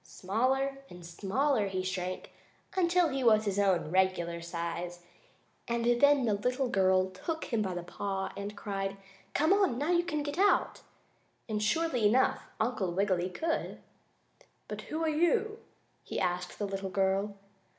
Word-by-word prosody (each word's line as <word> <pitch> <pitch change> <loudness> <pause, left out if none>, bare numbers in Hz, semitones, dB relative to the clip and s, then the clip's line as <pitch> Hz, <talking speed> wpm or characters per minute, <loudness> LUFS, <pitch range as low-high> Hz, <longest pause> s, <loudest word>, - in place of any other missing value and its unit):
Smaller 265 +8 -1
and 175 -1 -11
smaller 210 - 0
he 185 -1 -2
shrank, 185 0 -4 0.4
until 355 -2 +3
he 270 -1 -2
was 220 -2 +5
his 200 -1 0
own 190 -5 +2
regular 175 -2 +1
size, 170 +1 -4 0.7
and 235 0 -1 0.2
then 285 -2 +5
the 215 - +2
little 250 +5 0
girl 190 -2 +3
took 320 - -5
him 225 - +2
by 190 -3 -2
the 175 - -4
paw 195 +2 -4
and 200 +1 -6
cried: 195 -1 -3 0.4
"Come 315 +5 +4
on! 390 -12 +2
Now 295 +6 0
you 345 0 +3
can 305 -4 -2
get 290 +4 -4
out!" 405 +1 +3 0.7
And, 215 -2 -2
surely 245 0 +2
enough, 255 +5 +3 0.2
Uncle 220 -5 0
Wiggily 185 -1 +1
could. 325 - -2 0.9
"But - - -5
who 315 +2 -2
are - - +1
you?" 345 +8 +1 0.4
he - - -4
asked 180 -1 -2
the 205 - -2
little 195 -1 -4
girl. 195 +2 0
205 Hz, 155 wpm, -31 LUFS, 185-275 Hz, 0.9 s, was